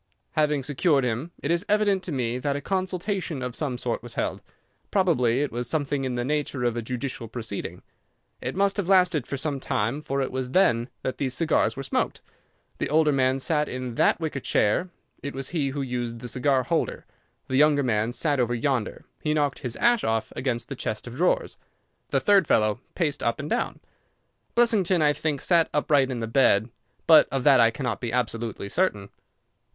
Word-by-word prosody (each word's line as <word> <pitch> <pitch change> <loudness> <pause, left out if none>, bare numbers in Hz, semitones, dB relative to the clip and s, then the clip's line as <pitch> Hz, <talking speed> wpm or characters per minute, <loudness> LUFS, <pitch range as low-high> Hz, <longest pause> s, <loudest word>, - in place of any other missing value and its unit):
"Having 150 -3 +1
secured 145 +1 +2
him, 125 +6 -2
it 145 - 0
is 170 +2 +1
evident 205 -2 +3
to 185 - -5
me 125 -3 -1
that 140 +1 -1
a - - -2
consultation 185 -4 -2
of 125 -1 -4
some 140 -5 -2
sort 120 -1 -3
was 120 -1 -9
held. - - -2 0.5
Probably 140 - +2
it 145 - -3
was 120 0 -4
something 145 -3 -1
in 125 -1 -2
the 120 0 -2
nature 145 -2 -1
of 120 -1 +1
a 120 - -2
judicial 125 0 -4
proceeding. 110 -3 -6 0.6
It - - -4
must 200 +1 +2
have 200 -4 -1
lasted 180 -8 +3
for 140 - -3
some 140 0 -2
time, 120 +3 -1
for 140 -2 -2
it 135 - -1
was 130 -1 -3
then 125 -7 +3
that 130 - -3
these 130 -2 -1
cigars 165 -4 +1
were 135 - -4
smoked. - - -1 0.6
The - - -1
older 155 0 +4
man 130 -1 +2
sat 150 +2 0
in 130 -1 -4
that - - +3
wicker 155 -4 -3
chair; 130 - +1 0.3
it 140 0 -6
was 135 -1 -3
he 150 -5 -1
who 140 +1 -3
used 120 -2 -3
the 125 +1 -8
cigar 130 +2 +1
holder. 165 +6 -1 0.4
The 130 - 0
younger 145 0 +4
man 110 -2 0
sat 145 +2 0
over 120 -1 +1
yonder; 120 -2 -2 0.2
he 150 0 0
knocked 145 -2 0
his 125 -3 -4
ash 240 -1 +3
off 110 -1 -1
against 120 -3 -2
the - - -6
chest 110 0 -4
of 120 - -8
drawers. 180 +3 +1 0.5
The - - +2
third 200 -5 +4
fellow 110 +1 +2 0.2
paced 155 -5 -1
up 115 - 0
and 140 - -4
down. - - -1 0.7
Blessington, 200 -8 +3
I 150 0 +4
think, 145 -2 -2
sat 170 -2 +3
upright 145 -2 +3
in 125 -3 -3
the 115 - -2
bed, 115 -2 +3 0.3
but 160 -2 +7
of 135 -2 -1
that 140 -3 +6
I 115 -1 +6
cannot 125 +2 -3
be 120 -2 -3
absolutely 115 -3 -2
certain. 100 - -1
135 Hz, 200 wpm, -25 LUFS, 120-155 Hz, 0.7 s, but